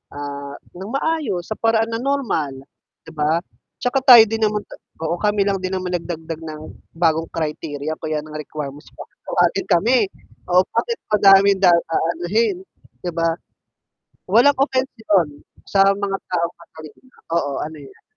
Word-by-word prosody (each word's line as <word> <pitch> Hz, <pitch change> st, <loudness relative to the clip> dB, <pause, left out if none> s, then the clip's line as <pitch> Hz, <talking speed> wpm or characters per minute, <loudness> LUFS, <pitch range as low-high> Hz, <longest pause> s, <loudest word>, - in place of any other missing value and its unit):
ah, 140 Hz, 0 st, -6 dB, 0.2 s
ng 190 Hz, -, -6 dB
maayos, 275 Hz, -, -1 dB
sa -, -, 0 dB
paraan 225 Hz, 0 st, +2 dB
ng 225 Hz, +1 st, -3 dB
normal, 230 Hz, -, -1 dB, 0.5 s
'di 160 Hz, -, -12 dB
ba? 155 Hz, +2 st, +1 dB, 0.4 s
Tsaka 250 Hz, +2 st, +1 dB
tayo 240 Hz, -3 st, +10 dB
din 225 Hz, +1 st, -3 dB
naman 210 Hz, 0 st, -2 dB
ta -, -, -11 dB, 0.3 s
oo, 165 Hz, +2 st, 0 dB
kami 210 Hz, -1 st, +2 dB
lang 195 Hz, -1 st, 0 dB
din 185 Hz, 0 st, -2 dB
naman 185 Hz, -1 st, -3 dB
nagdagdag 165 Hz, -2 st, -4 dB
ng 155 Hz, -1 st, -7 dB, 0.4 s
bagong 165 Hz, -1 st, +2 dB
criteria 150 Hz, -1 st, -4 dB
o -, -, -33 dB
kaya 155 Hz, -1 st, -2 dB
ng 155 Hz, 0 st, -12 dB
requirements 150 Hz, -1 st, -7 dB
para -, -, -11 dB, 0.2 s
tawagin 175 Hz, +2 st, +1 dB
kami, 220 Hz, +9 st, +4 dB, 0.5 s
oh, 180 Hz, +1 st, +5 dB
bakit 470 Hz, -1 st, -1 dB, 0.2 s
madaming 195 Hz, -1 st, +6 dB
da 185 Hz, -, +6 dB
aanuhin, 175 Hz, +5 st, 0 dB, 0.5 s
'di 175 Hz, -, -1 dB
ba? 165 Hz, 0 st, 0 dB, 0.9 s
Walang 245 Hz, +8 st, +6 dB
offence 265 Hz, -1 st, +1 dB
'yon, 175 Hz, -10 st, +1 dB, 0.2 s
sa 195 Hz, -, +3 dB
mga 200 Hz, -1 st, -2 dB
taong 170 Hz, -1 st, -1 dB
matalino. 160 Hz, -, -15 dB, 0.3 s
Oo, 170 Hz, -4 st, 0 dB
ano 155 Hz, 0 st, -6 dB
yan. 135 Hz, -, -16 dB
175 Hz, 155 wpm, -20 LUFS, 160-210 Hz, 0.9 s, tayo